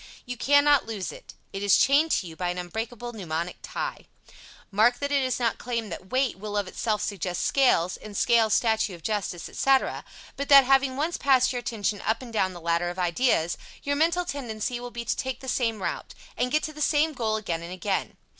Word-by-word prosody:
You 250 Hz, -1 st, -5 dB
cannot 285 Hz, +2 st, +4 dB
lose 210 Hz, -5 st, -4 dB
it. -, -, -13 dB, 0.2 s
It 195 Hz, -, -4 dB
is 200 Hz, -1 st, +5 dB
chained 290 Hz, +4 st, +4 dB
to -, -, +1 dB
you 165 Hz, -2 st, -9 dB
by 180 Hz, +1 st, -2 dB
an 180 Hz, -, -3 dB
unbreakable 225 Hz, +7 st, -5 dB
mnemonic 170 Hz, -4 st, -4 dB
tie. -, -, -5 dB, 0.6 s
Mark 225 Hz, +5 st, +4 dB
that 285 Hz, +2 st, -3 dB
it 280 Hz, -1 st, +3 dB
is 255 Hz, -1 st, -1 dB
not 235 Hz, -2 st, 0 dB
claimed 230 Hz, -4 st, -3 dB
that 185 Hz, +2 st, -8 dB
"weight" 260 Hz, -5 st, 0 dB
will 210 Hz, 0 st, -4 dB
of 200 Hz, -2 st, -1 dB
itself 210 Hz, +2 st, -2 dB
suggest 185 Hz, -3 st, -3 dB
"scales," 215 Hz, -10 st, +3 dB
and 210 Hz, -2 st, -9 dB
"scales" 225 Hz, -3 st, +4 dB
"statue 220 Hz, -4 st, +1 dB
of 165 Hz, -, -16 dB
Justice," 200 Hz, -5 st, -2 dB
etc., 270 Hz, -1 st, +1 dB, 0.3 s
but 280 Hz, -, -4 dB
that, 280 Hz, -1 st, +9 dB
having 265 Hz, 0 st, +3 dB
once 320 Hz, +4 st, -1 dB
passed 260 Hz, -2 st, +4 dB
your 245 Hz, -, -2 dB
attention 210 Hz, -4 st, -2 dB
up 225 Hz, +3 st, -1 dB
and 235 Hz, -2 st, -10 dB
down 190 Hz, -3 st, +1 dB
that 175 Hz, -, -10 dB
ladder 170 Hz, +1 st, 0 dB
of 175 Hz, -, -7 dB
ideas, 175 Hz, -1 st, +1 dB, 0.2 s
your 285 Hz, 0 st, 0 dB
mental 335 Hz, +4 st, +2 dB
tendency 245 Hz, -5 st, -4 dB
will 245 Hz, 0 st, -6 dB
be 235 Hz, 0 st, -6 dB
to -, -, 0 dB
take 260 Hz, 0 st, -4 dB
the 265 Hz, -, -10 dB
same 230 Hz, -5 st, -1 dB
route, -, -, -4 dB, 0.2 s
and 250 Hz, 0 st, -1 dB
get 305 Hz, -, +2 dB
to 310 Hz, -, -4 dB
the 305 Hz, -, -9 dB
same 305 Hz, +1 st, +2 dB
goal 225 Hz, -5 st, -1 dB
again 175 Hz, -6 st, -3 dB
and 170 Hz, +1 st, -8 dB
again. 185 Hz, +1 st, -2 dB
230 Hz, 215 wpm, -26 LUFS, 190-265 Hz, 0.6 s, that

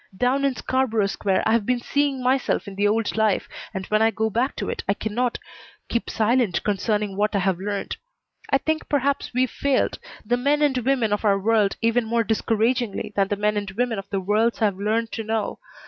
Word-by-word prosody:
Down 255 Hz, +4 st, +1 dB
in 275 Hz, -2 st, +1 dB
Scarborough 240 Hz, -6 st, 0 dB
Square 195 Hz, -1 st, 0 dB
I've 220 Hz, 0 st, +3 dB
been 250 Hz, +3 st, 0 dB
seeing 280 Hz, +1 st, 0 dB
myself 255 Hz, -3 st, +1 dB
in 200 Hz, -, -6 dB
the 205 Hz, +1 st, +1 dB
old 220 Hz, +1 st, 0 dB
life, 220 Hz, -2 st, +1 dB, 0.2 s
and 190 Hz, -2 st, -5 dB
when 215 Hz, +2 st, +1 dB
I 225 Hz, -, +5 dB
go 220 Hz, 0 st, -1 dB
back 245 Hz, +6 st, 0 dB
to -, -, -4 dB
it -, -, -3 dB
I 195 Hz, -, +3 dB
cannot 235 Hz, +4 st, -1 dB, 0.5 s
keep 235 Hz, -, -1 dB
silent 225 Hz, -3 st, +1 dB
concerning 210 Hz, 0 st, 0 dB
what 210 Hz, +1 st, 0 dB
I -, -, +3 dB
have 190 Hz, -2 st, +1 dB
learned. 200 Hz, +1 st, -3 dB, 0.5 s
I 275 Hz, -, +4 dB
think 315 Hz, +3 st, -2 dB
perhaps 280 Hz, -1 st, 0 dB
we've 255 Hz, +1 st, +1 dB
failed 280 Hz, -2 st, 0 dB, 0.3 s
the 245 Hz, +3 st, +1 dB
men 290 Hz, +4 st, +2 dB
and 285 Hz, -3 st, +3 dB
women 245 Hz, -4 st, +1 dB
of 205 Hz, -, -1 dB
our 200 Hz, -2 st, +4 dB
world 210 Hz, 0 st, +2 dB
even 230 Hz, +1 st, +2 dB
more 230 Hz, +1 st, +1 dB
discouragingly 225 Hz, 0 st, 0 dB
than 195 Hz, -1 st, +2 dB
the 205 Hz, -, -1 dB
men 210 Hz, +1 st, 0 dB
and 205 Hz, -1 st, -2 dB
women 225 Hz, +2 st, -1 dB
of 195 Hz, 0 st, -9 dB
the 195 Hz, -, -1 dB
worlds 215 Hz, +5 st, +1 dB
I've 205 Hz, -4 st, +1 dB
learned 220 Hz, +3 st, -1 dB
to 225 Hz, -, -4 dB
know. 220 Hz, -1 st, -2 dB
225 Hz, 210 wpm, -23 LUFS, 205-250 Hz, 0.5 s, I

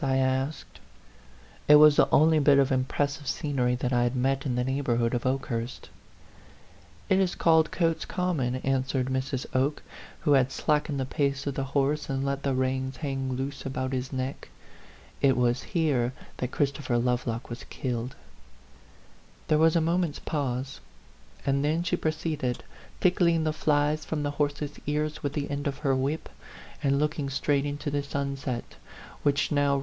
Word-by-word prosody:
I 135 Hz, -1 st, +2 dB
asked. 130 Hz, +3 st, -1 dB, 0.9 s
It 150 Hz, -, +9 dB
was 150 Hz, 0 st, +8 dB
the -, -, +4 dB
only 155 Hz, +1 st, +5 dB
bit 140 Hz, -1 st, +5 dB
of 140 Hz, -1 st, +3 dB
impressive 140 Hz, +2 st, -1 dB
scenery 130 Hz, -5 st, 0 dB
that 125 Hz, +1 st, -2 dB
I 120 Hz, -, +3 dB
had 120 Hz, +1 st, +1 dB
met 135 Hz, +2 st, 0 dB
in 125 Hz, -, -1 dB
the 125 Hz, -, +1 dB
neighborhood 125 Hz, -3 st, 0 dB
of 120 Hz, +1 st, -1 dB
Oke 135 Hz, +1 st, 0 dB
hurst. 115 Hz, 0 st, -5 dB, 0.6 s
" 85 Hz, 0 st, -26 dB
It 190 Hz, -, +4 dB
is 190 Hz, -2 st, +1 dB
called 160 Hz, -2 st, +4 dB
Cotes 165 Hz, -2 st, 0 dB
Common," 160 Hz, -9 st, -1 dB
answered 130 Hz, -1 st, 0 dB
Mrs. 130 Hz, 0 st, -2 dB
Oke, 135 Hz, +3 st, +1 dB, 0.4 s
who 150 Hz, -, +1 dB
had 135 Hz, -2 st, +4 dB
slackened 150 Hz, 0 st, 0 dB
the 130 Hz, -, 0 dB
pace 140 Hz, 0 st, -1 dB
of 140 Hz, -, -1 dB
the 135 Hz, 0 st, -2 dB
horse 145 Hz, +2 st, +1 dB
and 135 Hz, 0 st, -1 dB
let 140 Hz, 0 st, -1 dB
the 140 Hz, -2 st, 0 dB
reins 130 Hz, 0 st, -1 dB
hang 135 Hz, -3 st, -3 dB
loose 135 Hz, +2 st, -4 dB
about 130 Hz, -1 st, -3 dB
his 130 Hz, 0 st, -3 dB
neck. 130 Hz, +1 st, -4 dB, 0.7 s
"It 135 Hz, -2 st, +4 dB
was 120 Hz, 0 st, +2 dB
here 140 Hz, -8 st, 0 dB, 0.2 s
that 125 Hz, -, -2 dB
Christopher 140 Hz, -3 st, 0 dB
Love 125 Hz, +1 st, 0 dB
lock 115 Hz, +1 st, -3 dB
was 120 Hz, +1 st, -7 dB
killed." 125 Hz, -1 st, -4 dB, 1.3 s
There 155 Hz, -, +4 dB
was 160 Hz, +1 st, +4 dB
a 165 Hz, -, +4 dB
moment's 170 Hz, -1 st, 0 dB
pause; 135 Hz, -3 st, -3 dB, 0.7 s
and 140 Hz, 0 st, +1 dB
then 155 Hz, +3 st, +1 dB
she 170 Hz, -, 0 dB
proceeded, 155 Hz, -5 st, -2 dB, 0.4 s
tickling 170 Hz, -3 st, +3 dB
the 155 Hz, -1 st, 0 dB
flies 150 Hz, 0 st, +1 dB
from 155 Hz, -2 st, -3 dB
the 145 Hz, -, -1 dB
horse's 145 Hz, 0 st, -2 dB
ears 150 Hz, +1 st, -1 dB
with 145 Hz, -1 st, -2 dB
the 145 Hz, -1 st, -3 dB
end 145 Hz, 0 st, -2 dB
of 140 Hz, -1 st, -2 dB
her 135 Hz, -1 st, +3 dB
whip, 140 Hz, +5 st, -1 dB, 0.5 s
and 140 Hz, -1 st, +2 dB
looking 150 Hz, -1 st, -1 dB
straight 140 Hz, +1 st, 0 dB
into 145 Hz, +1 st, -4 dB
the 145 Hz, 0 st, 0 dB
sunset, 140 Hz, -3 st, -4 dB, 0.5 s
which 145 Hz, 0 st, +1 dB
now -, -, +1 dB
80 -, -, +2 dB
A 145 Hz, -, +4 dB
PHANTOM 140 Hz, -, +3 dB
LOVER. -, -, +1 dB
140 Hz, 180 wpm, -27 LUFS, 130-150 Hz, 1.3 s, It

